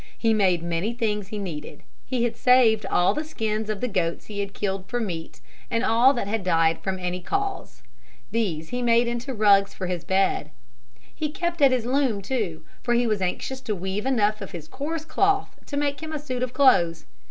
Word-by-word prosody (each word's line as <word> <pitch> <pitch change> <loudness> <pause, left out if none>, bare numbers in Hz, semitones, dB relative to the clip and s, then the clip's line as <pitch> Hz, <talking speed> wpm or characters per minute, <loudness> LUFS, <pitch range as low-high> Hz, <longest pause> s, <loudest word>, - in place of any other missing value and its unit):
He 225 -1 +2
made 185 -5 +2
many 170 +6 -1
things 210 -4 -1
he 210 - -6
needed. 155 -7 -6 0.2
He 250 -2 0
had 235 -1 0
saved 235 -4 +4
all 180 - +3
the 305 - -2
skins 220 -7 -3
of 215 -2 -3
the 250 - 0
goats 180 -6 -1
he 205 -1 -6
had 200 -1 -4
killed 195 -1 -2
for 245 - -1
meat 175 -8 -5 0.3
and 230 0 0
all 235 +4 +5
that 240 - -2
had 215 -1 -1
died 165 -2 +2
from 190 -1 -2
any 180 0 -3
cause. 400 - -3 0.5
These 170 -9 -1
he 245 0 -2
made 235 0 +4
into 240 +2 -3
rugs 205 -4 +4
for 185 - -4
his 180 -2 -3
bed. 190 +2 +1 0.6
He 305 - -3
kept 345 +1 -3
at 275 - +8
his 250 -3 0
loom 250 -6 +1
too, 190 -10 -3 0.2
for 240 -1 +1
he 240 +1 +3
was 215 -3 0
anxious 255 +8 -2
to 220 -5 -2
weave 190 +5 -3
enough 215 -5 +2
of 195 - -7
his 160 -3 -7
coarse 310 - -4
cloth 395 +3 +1
to 285 - -4
make 285 -1 0
him 315 0 -5
a - - -1
suit 255 -4 -4
of 255 -1 -1
clothes. 175 - +3
220 Hz, 210 wpm, -25 LUFS, 190-255 Hz, 0.6 s, at